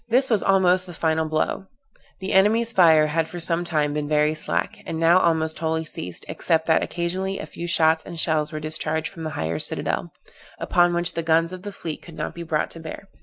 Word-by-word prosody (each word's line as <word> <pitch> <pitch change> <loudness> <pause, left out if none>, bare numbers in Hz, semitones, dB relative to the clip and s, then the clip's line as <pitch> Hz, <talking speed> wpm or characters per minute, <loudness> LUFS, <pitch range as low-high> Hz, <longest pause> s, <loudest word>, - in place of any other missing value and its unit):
This 255 +2 +3
was 215 - +3
almost 185 -1 +3
the 175 - -8
final 160 -1 0
blow; 155 +5 -1 0.5
the 190 - -3
enemy's 220 +4 +4
fire 160 -6 +6
had 160 +1 -1
for 175 - -7
some 170 0 0
time 150 -4 0
been 150 0 -2
very 150 0 +2
slack, 85 - -2
and 160 - -3
now 170 +2 +5
almost 160 -2 0
wholly 160 0 -1
ceased, 90 - -6
except 160 -1 0
that 160 - +3
occasionally 185 +3 -2
a - - -5
few 170 - -7
shots 160 -1 +3
and 170 -2 -7
shells 155 -1 +1
were 155 - -4
discharged 155 +1 -1
from 165 -4 -8
the - - -2
higher 80 0 -2
citadel, - - -2 0.5
upon 175 0 +2
which 175 0 -1
the 165 - -2
guns 165 +2 +2
of 185 - -7
the 205 +1 -6
fleet 165 -5 -6
could 165 - -13
not - - -4
be 170 - -8
brought 160 -2 -1
to 165 - -6
bear. 165 +4 -9
165 Hz, 220 wpm, -23 LUFS, 155-180 Hz, 0.5 s, fire